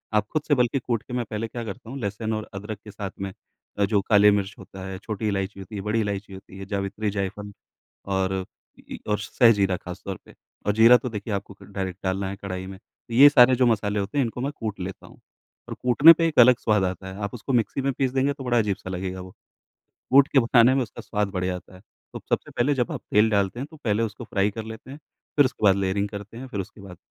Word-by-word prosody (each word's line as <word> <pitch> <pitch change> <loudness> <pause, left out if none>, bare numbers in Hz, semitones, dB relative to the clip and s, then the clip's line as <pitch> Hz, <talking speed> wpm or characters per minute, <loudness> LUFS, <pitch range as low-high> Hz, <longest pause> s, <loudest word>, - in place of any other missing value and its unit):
आप 105 0 +2
खुद 155 - +1
से 145 - +4
बल्कि 125 +2 +1
कूट 120 -3 -2
के 125 - -10
मैं 125 -1 -1
पहले 110 +1 -3
क्या 120 +1 -6
करता 115 +2 -8
हूँ 135 - -6
लहसुन 110 +1 -3
और 110 0 -4
अदरक 100 +1 -6
के 105 - -10
साथ 100 -1 -6
में 95 -1 -3 0.5
अ, 100 - +4
जो 100 -1 +1
काली 105 -1 +7
मिर्च 100 -1 -1
होता 95 -1 -10
है, 95 - -5
छोटी 110 0 -4
इलायची 100 0 -2
होती 95 +3 -9
है, 100 - -3
बड़ी 105 +3 0
इलायची 100 -1 -4
होती 95 0 -12
है, 95 - -7
जावित्री 100 +2 -2
जायफल 100 +1 -4 0.6
और 95 0 0 0.5
ई - - -17
ई - - -11
और 105 - +1
सह 115 +3 +4
जीरा 100 -3 +1
खास 90 +2 -9
तौर 95 -2 -4
पे - - -16 0.3
और 105 - +2
जीरा 115 +3 +7
तो 125 +2 -5
देखिए 105 -1 -5
आपको 100 0 -4
क - - -11
डायरेक्ट 95 -2 -4
डालना 95 0 -1
है 100 - -5
कढ़ाई 95 -2 -5
में। 95 - -9 0.3
ये 140 +5 +8
सारे 130 -2 +6
जो 125 - +3
मसाले 105 -2 +1
होते 100 +8 -3
हैं 135 - +4
इनको 120 +1 -5
मैं 140 +2 -1
कूट 110 -4 -4
लेता 90 +1 -7
हूँ, - - -17 0.5
और - - -4
कूटने 135 +7 +8
पे 165 0 +1
एक 155 -4 0
अलग 125 0 +8
स्वाद 105 -3 +2
आता 95 0 -3
है। - - -10
आप 100 - -4
उसको 125 +3 -4
मिक्सी 120 +3 +1
में 140 - 0
पीस 130 0 0
देंगे 135 +2 +1
तो 135 -1 -9
बड़ा 120 -1 +1
अजीब-सा 105 -4 -1
लगेगा 95 0 -4
वो। 90 0 -10
तो - - -29 0.8
कूट 140 0 +8
के 140 - +5
बनाने 120 +1 +5
में 135 - +2
उसका 115 - -9
स्वाद 105 -2 -1
बढ़िया 90 -1 -2
आता 90 - -11
है। 90 - -15 0.3
तो - - -6
सबसे - - -1
पहले 135 +4 +1
जब 125 -4 -1
आप - - -5
तेल 105 +2 +5
डालते 100 +2 0
हैं 140 - -4
तो - - -12
पहले 110 +1 +1
उसको 110 +2 -5
फ्राई 100 -1 0
कर 110 +2 -6
लेते 110 +4 -9
हैं, 145 - -9 0.4
फिर 145 - +6
उसके 130 - -4
बाद 95 -2 +6
लेयरिंग 100 +1 -1
करते 105 +3 -9
हैं। 130 - -7
फिर 105 -6 -5
उसके 100 +2 -12
बाद 95 -3 -11
105 Hz, 260 wpm, -24 LUFS, 100-120 Hz, 0.8 s, ये